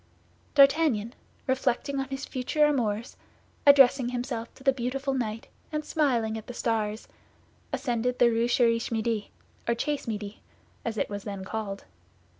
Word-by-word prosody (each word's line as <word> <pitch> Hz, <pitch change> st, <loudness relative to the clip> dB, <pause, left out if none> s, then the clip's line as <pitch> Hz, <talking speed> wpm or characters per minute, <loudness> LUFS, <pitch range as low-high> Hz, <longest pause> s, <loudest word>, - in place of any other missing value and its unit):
D'Artagnan, 275 Hz, -6 st, +4 dB, 0.3 s
reflecting 265 Hz, +1 st, 0 dB
on 270 Hz, 0 st, -3 dB
his 270 Hz, +1 st, -4 dB
future 295 Hz, +4 st, +1 dB
amours, 235 Hz, -6 st, -1 dB, 0.5 s
addressing 270 Hz, -3 st, +7 dB
himself 245 Hz, -2 st, -4 dB
to 265 Hz, -, -15 dB
the 270 Hz, 0 st, +4 dB
beautiful 265 Hz, +2 st, -2 dB
night, 225 Hz, -4 st, -2 dB, 0.3 s
and 305 Hz, -1 st, -2 dB
smiling 235 Hz, -8 st, +1 dB
at 220 Hz, -, -14 dB
the 245 Hz, -, -7 dB
stars, 220 Hz, -2 st, -1 dB, 0.6 s
ascended 250 Hz, -2 st, -1 dB
the 240 Hz, -1 st, +5 dB
Rue 230 Hz, +1 st, +2 dB
Cherish 235 Hz, -2 st, +2 dB
Midi, 225 Hz, -1 st, -1 dB, 0.4 s
or 235 Hz, -, +2 dB
Chase 290 Hz, +3 st, -2 dB
Midi, 210 Hz, -1 st, -5 dB, 0.4 s
as 225 Hz, -1 st, -3 dB
it -, -, 0 dB
was 205 Hz, -1 st, -6 dB
then 200 Hz, -2 st, -6 dB
called. 200 Hz, -1 st, -4 dB
240 Hz, 145 wpm, -28 LUFS, 220-270 Hz, 0.6 s, addressing